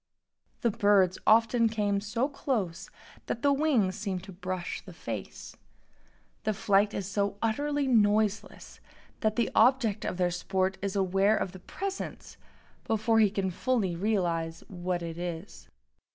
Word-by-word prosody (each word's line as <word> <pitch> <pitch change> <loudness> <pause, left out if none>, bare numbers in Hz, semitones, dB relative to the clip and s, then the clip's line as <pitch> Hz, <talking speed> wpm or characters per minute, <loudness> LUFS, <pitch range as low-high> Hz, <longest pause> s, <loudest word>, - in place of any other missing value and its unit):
The 235 - +2
birds 200 -4 +3
often 230 +1 +5
came 205 -2 0
so 230 +5 -1
close 220 - -3 0.4
that 235 - -3
the 285 0 +4
wings 265 -11 +2
seemed 195 -3 -3
to 195 - -10
brush 185 -1 -4
the 185 - -12
face. 110 - -7 0.9
The 215 -1 -1
flight 200 +1 +2
is 195 - -3
so 200 0 -1
utterly 285 +6 0
noiseless 215 -4 +1 0.4
that 215 -1 0
the 235 -2 0
object 230 -3 +3
of - - -3
their 180 -1 +1
sport 190 +2 -1
is 200 0 -3
aware 195 +2 +3
of 190 - -2
the 185 - -11
presence 390 - -6 0.5
before 225 +1 +2
he 215 -2 +5
can 195 -2 -2
fully 200 -2 0
realize 170 -4 -1
what 180 -1 -3
it 165 0 -6
is. 175 +2 -6
200 Hz, 145 wpm, -29 LUFS, 185-225 Hz, 0.9 s, often